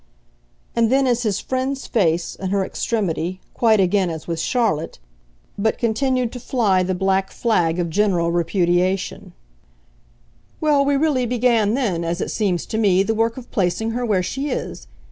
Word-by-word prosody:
And 230 0 +2
then 270 +1 +3
as 245 -2 +1
his 210 -4 0
friend's 260 +1 -3
face, 170 -6 0
in 190 - -5
her 195 0 +1
extremity, 185 -6 -2
quite 220 -3 +3
again 190 0 +2
as 160 -2 -6
with 165 -1 -3
Charlotte, 205 -5 0 0.6
but 220 +2 +1
continued 250 +1 0
to 250 - -7
fly 225 -7 +1
the 185 +1 -1
black 190 +1 +1
flag 175 -8 0
of 175 -1 0
general 180 -3 +1
repudiation: 175 +2 0 1.3
"Well, 295 -3 +3
we 280 0 +2
really 275 -5 +1
began 230 -3 +2
then, 200 -11 -1
as 170 +1 -2
it - - -3
seems 190 -6 -1
to 220 - -3
me, 195 -3 +4
the 225 - 0
work 225 +2 0
of 250 -2 -10
placing 205 +3 0
her 245 +2 -2
where 205 -6 +1
she 270 +10 -3
is. - - -5
210 Hz, 165 wpm, -21 LUFS, 180-245 Hz, 1.3 s, me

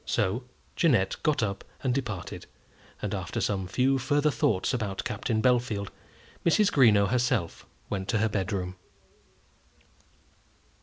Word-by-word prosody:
So 115 +7 0 0.3
Jeannette 115 - +2
got 150 -6 +1
up 100 -2 -2 0.2
and 130 -2 +1
departed, 120 -9 -4 0.6
and - - -2
after - - -3
some 95 -3 -1
few 130 +6 +2
further 145 +4 +2
thoughts 105 -3 +1
about 105 -6 -2
Captain 110 -3 -1
Bellfield, 120 -5 +1 0.5
Mrs. 205 +5 +4
Greenow 110 -7 +5
herself 125 -7 0 0.2
went 95 -1 -3
to 115 - +1
her 110 +1 +2
bedroom. 95 -2 -2
110 Hz, 120 wpm, -28 LUFS, 100-130 Hz, 0.6 s, Greenow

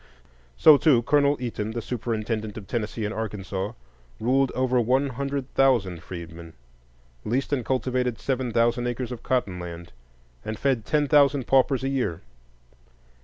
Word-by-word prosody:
So, 155 -2 +8
too, 135 -6 +4
Colonel 145 +2 +3
Eaton, 110 -3 -4
the 120 - -3
superintendent 110 -2 -3
of 105 - -8
Tennessee 110 +1 -3
and 105 - -3
Arkansas, 100 -3 -4 0.5
ruled 135 +3 +2
over 130 -1 +2
one 130 +4 +2
hundred 140 +1 -4
thousand 105 -11 +2
freedmen, 85 -2 -9 0.7
leased 130 +5 -1
and 130 -4 0
cultivated 125 -1 -1
seven 130 -2 -2
thousand 120 +1 +1
acres 120 +1 -3
of 120 - -6
cotton 100 -8 -1
land, 85 0 -8 0.5
and 110 0 -4
fed 130 -3 0
ten 150 +3 +1
thousand 140 -2 +4
paupers 135 0 +3
a 135 - 0
year. 130 -12 -2
120 Hz, 145 wpm, -25 LUFS, 105-135 Hz, 0.7 s, So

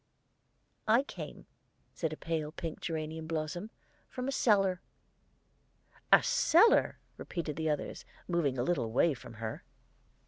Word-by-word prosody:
"I 230 +5 +5
came," - - -8 0.5
said 160 - -2
the 155 - -6
pale 160 -2 -2
pink 165 0 -6
geranium 160 0 -4
blossom, 160 +5 -3 0.4
"from 255 0 -4
a - - 0
cellar." 195 -8 +3 1.3
"A - - +8
cellar!" 460 -4 +4 0.2
repeated 165 -4 -4
the 160 +1 -1
others, 150 - -3 0.2
moving 165 -7 +1
a 120 - +1
little 145 -4 +1
away 125 +8 +3
from 120 -2 -11
her. 110 0 -5
160 Hz, 130 wpm, -32 LUFS, 150-195 Hz, 1.3 s, A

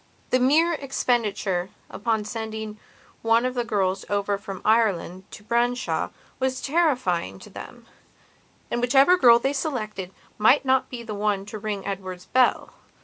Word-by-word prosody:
The 255 - +4
mere 310 +7 +4
expenditure 215 - -1 0.2
upon 220 -3 -2
sending 220 -1 -5 0.4
one 230 +2 +3
of 255 - -1
the 245 -1 -1
girls 195 -3 0
over 205 0 0
from 195 -2 -8
Ireland 200 -4 +1
to 210 - -12
Branshaw 240 +3 0 0.3
was 260 0 -1
terrifying 255 - 0
to - - -14
them; - - -10 0.9
and 240 - -1
whichever 270 +8 +5
girl 240 -9 +7
they 270 +4 -1
selected 215 - -3 0.3
might 250 +7 +5
not 260 0 +2
be 240 -2 -7
the 220 -2 -6
one 205 -1 -1
to 210 +1 -7
ring 205 -2 -4
Edward's 185 -2 -5
bell. 255 -1 +2
220 Hz, 145 wpm, -24 LUFS, 200-255 Hz, 0.9 s, girl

